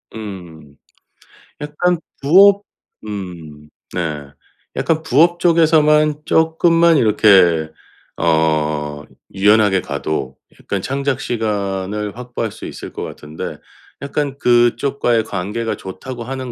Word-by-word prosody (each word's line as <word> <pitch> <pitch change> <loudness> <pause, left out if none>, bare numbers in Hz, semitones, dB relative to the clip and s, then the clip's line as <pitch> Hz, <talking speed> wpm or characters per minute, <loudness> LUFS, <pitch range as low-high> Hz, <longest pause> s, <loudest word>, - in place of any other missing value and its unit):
음. 85 -9 -9 0.9
약간 160 +4 0 0.2
부업 195 +7 +6 0.4
음 85 -7 -8 0.2
네. 75 -5 -4 0.5
약간 160 -1 0
부업 165 +5 +3
쪽에서만 155 -3 +3
쪼끔만 165 +1 +3
이렇게 95 - +4 0.5
어 75 -2 0 0.3
유연하게 105 -1 +3
가도 70 -6 -4 0.2
약간 100 - -4
창작 135 +2 -2
시간을 105 -2 -3
확보할 120 -3 -4
수 - - -10
있을 - - -8
것 - - -5
같은데. 75 +1 -7 0.4
약간 140 -1 -3
'그쪽과의 120 -1 +2
관계가 105 +3 -3
좋다고 115 +6 -8
하는 130 0 -5
110 Hz, 215 characters per minute, -18 LUFS, 90-145 Hz, 0.9 s, 부업